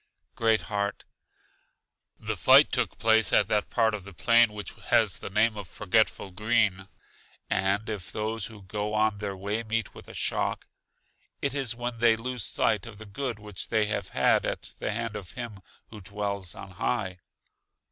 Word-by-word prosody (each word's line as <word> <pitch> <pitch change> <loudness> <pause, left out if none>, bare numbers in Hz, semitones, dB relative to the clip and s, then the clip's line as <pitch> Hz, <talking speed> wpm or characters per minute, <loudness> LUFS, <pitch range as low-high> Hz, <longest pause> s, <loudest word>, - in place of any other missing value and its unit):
Great 110 -1 +2
heart: 100 -1 -3 1.1
The - - -3
fight - - +6
took - - 0
place 110 -1 +4
at 100 - +4
that 105 -1 +1
part 115 -2 +2
of 105 -3 -4
the 100 -1 -11
plain 115 +4 +5
which 105 -1 -6
has - - +3
the - - -6
name 110 +3 +3
of 100 -3 -7
Forgetful 100 0 +1
Green. 105 -1 +1 0.6
And 100 +3 +1
if 105 -5 -4
those 110 -1 -2
who 110 -3 -12
go 105 +2 -3
on 105 -1 +2
their 100 -2 -4
way, 100 +4 -2
meet 115 -1 -2
with - - -12
a - - -11
shock, - - -1 0.7
it 140 -2 0
is 135 -5 -1
when 120 -1 -4
they 115 -1 +5
lose 125 0 -3
sight 105 +4 +1
of 110 -3 -10
the 110 - -10
good 120 +3 -4
which 105 -3 -6
they 110 -2 +2
have 100 -2 -2
at - - +1
the - - -1
hand 115 0 -3
of 90 -6 -7
Him 115 -5 -7 0.3
who 105 -2 -9
dwells 100 -2 -4
on 95 - -9
high. 95 -1 -2
105 Hz, 175 wpm, -28 LUFS, 100-115 Hz, 1.1 s, fight